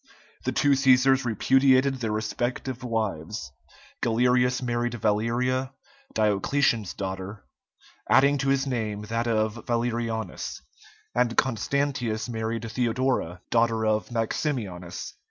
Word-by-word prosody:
The - - +1
two 145 - +2
Cæsars 130 -1 +4
repudiated 130 +3 +3
their 115 -3 -2
respective 120 +4 -3
wives; 105 - -3 0.5
Galerius 125 +2 +2
married 120 -1 -1
Valeria, 120 +4 0 0.4
Diocletian's 110 0 +1
daughter, 95 +1 -5 0.6
adding 140 +3 +5
to 135 +1 0
his 135 0 +2
name 110 -5 -2
that 115 +2 -2
of 110 0 0
Valerianus; 115 - -2 0.5
and 120 -1 +1
Constantius 125 -2 0
married 115 -1 -3
Theodora, 120 -7 0
daughter 115 -1 +2
of 110 -3 +1
Maximianus. 115 - -3
115 Hz, 100 wpm, -26 LUFS, 110-130 Hz, 0.6 s, adding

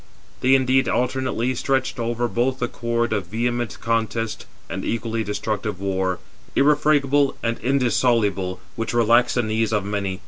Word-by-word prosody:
They 130 +1 +4
indeed 130 0 +3
alternately 125 0 0
stretched 130 0 -1
over 120 +1 -1
both 125 +3 0
the 125 - -1
cord 120 -1 -1
of 100 -5 -2
vehement 120 +2 -2
contest 115 -1 -1 0.2
and - - -5
equally 115 -1 -2
destructive 105 -1 -3
war, 95 -2 -1 0.4
irrefragable 145 -1 +3
and 115 0 -1
indissoluble, 115 -8 +1 0.2
which 115 +1 -3
relaxed 120 +1 +4
the 125 - +2
knees 110 0 0
of 105 -2 0
many. 100 -2 -2
115 Hz, 140 wpm, -22 LUFS, 110-125 Hz, 0.4 s, They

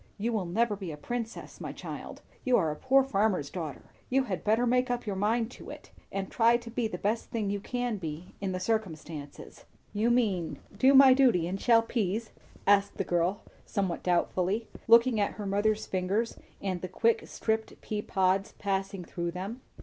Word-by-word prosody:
"You 230 +3 -1
will 200 -5 -1
never 215 +4 +1
be 190 -4 -6
a 150 - -7
princess, 230 +8 -5
my - - -4
child. - - -8 0.2
You 255 -2 +4
are 160 -6 +1
a - - -4
poor 265 - +4
farmer's 200 - 0
daughter. 160 -6 -6 0.2
You 265 +1 +3
had 195 -8 -4
better 220 +3 +3
make 250 +1 +2
up 245 0 -2
your 205 -2 -2
mind 225 +4 +1
to - - -11
it, - - -10 0.2
and 195 -1 -3
try 235 0 +4
to 235 -1 -10
be 235 -1 0
the 180 - -5
best 215 +5 -1
thing 210 -4 -1
you 205 - -1
can 245 -1 -3 0.4
in 195 -1 -1
the 185 - -2
circumstances." 165 -8 -4 0.3
"You 215 +3 +2
mean, 210 -9 +1 0.2
do 265 +6 +5
my 265 -1 +9
duty 245 -11 +4
and 195 +2 -4
shell 230 -2 +5
peas?" 220 -1 -2 0.3
asked 200 0 +3
the - - 0
girl 175 +2 0 0.2
somewhat 190 -4 -2
doubtfully, 185 +4 0 0.2
looking 230 0 +6
at 205 - +1
her 210 - -6
mother's 205 +2 +1
fingers 195 +5 -1 0.2
and 185 -3 -3
the 185 - -3
quick 225 +5 +1
stripped 220 0 -2
pea 210 -1 -3
pods 190 0 +1
passing 195 -2 -2
through 170 +1 -3
them. 195 +8 -5
210 Hz, 190 wpm, -29 LUFS, 185-230 Hz, 0.4 s, my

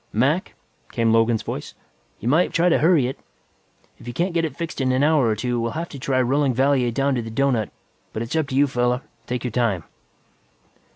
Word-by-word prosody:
"Mac," 140 - +1 0.4
came 115 -2 +2
Logan's 115 0 +2
voice, - - -6 0.4
"you 115 - -5
might 160 +8 +3
try 175 +2 +3
to 170 - +3
hurry 160 -4 +4
it. 130 - -4 0.8
If - - -13
you 120 - -5
can't 175 +1 0
get 165 -1 +1
it 160 - -3
fixed 165 -4 -4
in 130 -1 +2
an 130 +2 +2
hour 150 -4 +3
or 110 - +1
two, 120 +2 -2
we'll 115 0 -2
have 170 +1 -4
to 140 - -9
try 130 0 0
rolling 135 +1 +2
Valier 130 -1 +2
down 135 +4 0
to 125 - 0
the 115 - -7
doughnut. 120 -2 0 0.4
But 110 - -3
it's 115 - -5
up 160 -3 +1
to 135 - -4
you, 140 +2 +5
fella. 125 -1 0 0.2
Take 125 0 -3
your 125 - -2
time." 110 -7 0
130 Hz, 220 wpm, -22 LUFS, 120-145 Hz, 0.8 s, you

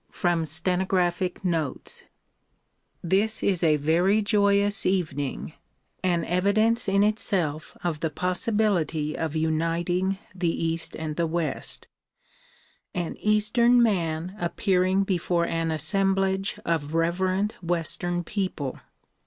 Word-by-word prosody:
From 170 -2 0
Stenographic 180 +3 0
Notes 160 -6 -1 1.0
THIS 200 +5 +1
is 190 -4 +1
a 155 -2 +4
very 175 +8 +2
joyous 200 -1 +3
evening, 155 -7 -2 0.5
an 175 -2 +1
evidence 210 +6 +2
in 195 +1 +3
itself 180 -8 0
of 165 -4 -1
the 160 - -1
possibility 180 -4 0
of 160 -1 -3
uniting 165 +4 0 0.2
the 180 -2 -1
east 165 0 -2
and 155 -1 -5
the 170 -1 +1
west; 160 -3 -2 1.1
an 175 -2 -3
eastern 215 +3 +3
man 175 -4 -1
appearing 185 +2 +1
before 175 -2 0
an 165 -1 -1
assemblage 195 +5 +1
of 160 -2 -1
reverent 185 +5 0
western 175 0 -1
people. 180 -8 -3
175 Hz, 105 wpm, -25 LUFS, 165-195 Hz, 1.1 s, a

